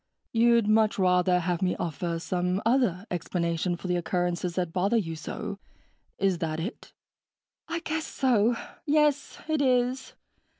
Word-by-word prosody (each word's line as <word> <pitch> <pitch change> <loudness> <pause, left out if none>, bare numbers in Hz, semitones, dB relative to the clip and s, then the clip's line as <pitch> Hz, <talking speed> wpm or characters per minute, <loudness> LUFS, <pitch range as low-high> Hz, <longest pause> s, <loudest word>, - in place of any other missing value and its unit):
"You'd 235 -1 +4
much 215 0 +3
rather 180 -1 +3
have 175 +1 -1
me 180 -1 +1
offer 170 0 -3
some 180 +2 -1
other 225 -6 +2
explanation 175 0 -1
for - - -13
the 180 -1 +1
occurrences 175 0 -1
that 175 -3 -2
bother 195 +5 +2
you 165 -7 -2
so 200 +5 -6 0.6
is 190 -3 +1
that 160 -2 -2
it?" 190 +9 -6 0.8
"I 335 0 -3
guess 315 0 -3
so. 240 -3 +2 0.3
Yes, 295 -1 +2
it 310 -2 +1
is. 255 -1 +1
185 Hz, 140 wpm, -27 LUFS, 175-240 Hz, 0.8 s, You'd